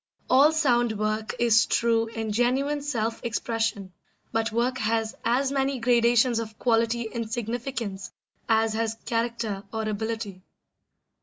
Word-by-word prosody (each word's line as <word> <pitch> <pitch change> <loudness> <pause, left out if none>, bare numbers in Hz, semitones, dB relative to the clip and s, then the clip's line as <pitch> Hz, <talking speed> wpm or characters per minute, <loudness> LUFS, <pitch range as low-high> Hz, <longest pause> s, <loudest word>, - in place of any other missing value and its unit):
All 275 +4 +6
sound 240 -8 +2
work 215 +1 -2
is 230 -1 +4
true 230 -1 +2
and 220 -2 -2
genuine 265 +6 +1
self 230 -6 -2
expression, 225 -4 -2 0.4
but 225 0 0
work 245 +4 0
has 225 +1 0
as 255 +4 +1
many 275 0 0
gradations 235 0 +3
of 220 -1 -6
quality 230 -1 +1
and 230 -2 -4
significance 230 -4 -4 0.4
as 225 0 +3
has 225 0 -1
character 230 -3 -2
or 220 -1 -3
ability. 215 -2 -4
230 Hz, 130 wpm, -26 LUFS, 220-240 Hz, 0.4 s, All